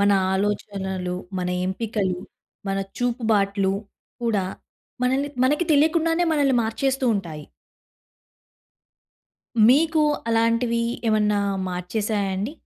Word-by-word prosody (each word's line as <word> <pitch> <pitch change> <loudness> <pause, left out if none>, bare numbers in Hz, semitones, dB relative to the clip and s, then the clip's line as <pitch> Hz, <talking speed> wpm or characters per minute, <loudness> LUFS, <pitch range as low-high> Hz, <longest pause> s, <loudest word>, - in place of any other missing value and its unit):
మన 200 0 +4 0.2
ఆలోచనలు, 190 -2 -2 0.2
మన 180 - -2 0.2
ఎంపికలు, 190 -2 -2 0.5
మన 195 0 0 0.2
చూపుబాట్లు 210 -5 +1 0.5
కూడా 215 -5 +1 0.6
మనల్ని 270 +3 +1 0.2
మనకి 295 +6 +2
తెలియకుండానే 325 +3 +3
మనల్ని 280 -4 +2
మార్చేస్తూ 265 +4 -1
ఉంటాయి. 160 -7 -5 2.2
మీకు 310 +4 +4 0.3
అలాంటివి 230 +1 +2 0.3
ఏమన్నా 210 -1 +2 0.3
మార్చేసాయా 200 +3 -2
అండి? 205 +9 -3
220 Hz, 85 wpm, -23 LUFS, 195-260 Hz, 2.2 s, మన